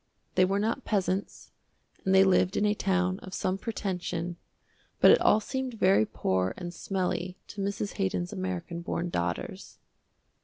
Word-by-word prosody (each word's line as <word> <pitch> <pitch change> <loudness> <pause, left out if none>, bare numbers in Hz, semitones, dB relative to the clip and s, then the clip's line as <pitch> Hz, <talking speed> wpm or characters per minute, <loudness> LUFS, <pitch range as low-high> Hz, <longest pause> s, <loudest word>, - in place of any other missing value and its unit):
They 185 - +5
were 195 +2 0
not 215 +3 -1
peasants, 195 -2 -2 0.5
and 190 0 +3
they 190 - +8
lived 185 -1 +3
in 205 - +2
a 210 - +3
town 185 -2 0
of 185 - -8
some 185 +1 -1
pretension, 180 -5 -3 0.6
but - - +8
it - - +5
all 215 - +5
seemed 260 +2 -4
very 185 - +4
poor 95 0 0
and 175 -1 -6
smelly 185 0 -2
to 205 - -6
Mrs. 200 +1 -3
Haydon's 185 -1 -1
american 180 -3 -4
born 175 0 -2
daughters. 85 - -3
185 Hz, 155 wpm, -29 LUFS, 175-200 Hz, 0.6 s, they